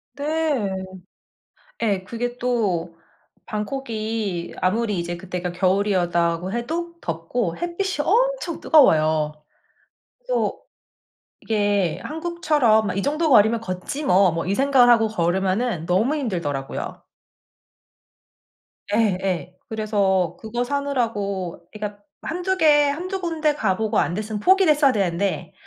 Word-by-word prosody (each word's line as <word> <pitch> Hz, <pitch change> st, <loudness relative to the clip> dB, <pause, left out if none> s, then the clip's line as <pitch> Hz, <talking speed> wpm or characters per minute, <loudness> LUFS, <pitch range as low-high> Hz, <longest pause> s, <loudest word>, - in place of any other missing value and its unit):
네. 295 Hz, -6 st, 0 dB, 1.1 s
예 200 Hz, -4 st, 0 dB
그게 240 Hz, +4 st, -4 dB
또 190 Hz, -10 st, -1 dB, 0.5 s
방콕이 215 Hz, -5 st, -3 dB
아무리 210 Hz, +1 st, +1 dB
이제 170 Hz, 0 st, -4 dB
그때가 180 Hz, -1 st, -4 dB
겨울이었다고 180 Hz, -2 st, +1 dB
해도 335 Hz, +8 st, -3 dB
덥고 165 Hz, +3 st, -3 dB
햇빛이 345 Hz, -2 st, -2 dB
엄청 -, -, +1 dB
뜨거워요. 155 Hz, -, +4 dB, 0.9 s
그래서 -, -, -1 dB, 0.8 s
이게 205 Hz, -5 st, 0 dB
한국처럼 300 Hz, -9 st, +1 dB
'아 -, -, -4 dB
이 195 Hz, -, -1 dB
정도 305 Hz, +4 st, 0 dB
거리면 225 Hz, -1 st, +5 dB
걷지 185 Hz, +9 st, -5 dB
뭐.' 190 Hz, -, +4 dB
뭐 165 Hz, +1 st, -3 dB
이 190 Hz, -, 0 dB
생각을 265 Hz, -2 st, +4 dB
하고 225 Hz, -1 st, +3 dB
걸으면은 190 Hz, 0 st, 0 dB
너무 215 Hz, -, +1 dB
힘들더라고요. 170 Hz, -, -4 dB, 1.9 s
예. 185 Hz, -5 st, 0 dB
그래서 200 Hz, -5 st, 0 dB
그거 235 Hz, +2 st, -3 dB
사느라고 225 Hz, -11 st, -2 dB
그러니까 210 Hz, -1 st, -6 dB, 0.2 s
1-2 360 Hz, +3 st, -2 dB
개 295 Hz, -3 st, +5 dB
1-2 370 Hz, +6 st, -3 dB
군데 320 Hz, -3 st, 0 dB
가보고 215 Hz, -5 st, 0 dB
안 170 Hz, -, 0 dB
됐으면 215 Hz, +2 st, -3 dB
포기를 375 Hz, -, +5 dB
했어야 290 Hz, -2 st, +4 dB
되는데 190 Hz, -4 st, -1 dB
215 Hz, 250 characters per minute, -22 LUFS, 185-285 Hz, 1.9 s, 거리면